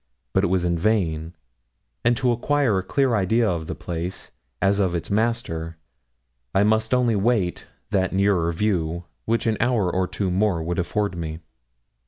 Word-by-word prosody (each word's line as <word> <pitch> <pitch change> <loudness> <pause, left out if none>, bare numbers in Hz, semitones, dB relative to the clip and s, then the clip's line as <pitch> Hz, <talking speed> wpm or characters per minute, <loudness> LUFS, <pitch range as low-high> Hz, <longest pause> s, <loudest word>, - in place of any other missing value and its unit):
But - - +3
it - - +3
was 90 0 +1
vain, 85 -2 0 0.7
and 120 0 +3
to 130 -2 +2
acquire 120 -3 +1
a - - -4
clear 135 +5 +1
idea 110 +3 +2
of 85 -4 -2
the - - -4
place, 85 +2 -5 0.3
as 100 +1 +2
of 95 -3 +1
its 85 - -4
master, 100 -7 -1 0.8
I 95 - +5
must 110 +1 +2
only 125 -3 +3
wait 100 -4 0 0.2
that 95 -3 +1
nearer 95 -3 +2
view 85 -2 -1 0.2
which 115 +1 0
an 110 -2 +1
hour 115 -7 +1
or 95 0 +1
two 95 -1 -2
more 95 -3 +1
would 85 +3 -2
afford 100 +2 -1
me. 80 -1 -5
95 Hz, 165 wpm, -23 LUFS, 85-110 Hz, 0.8 s, I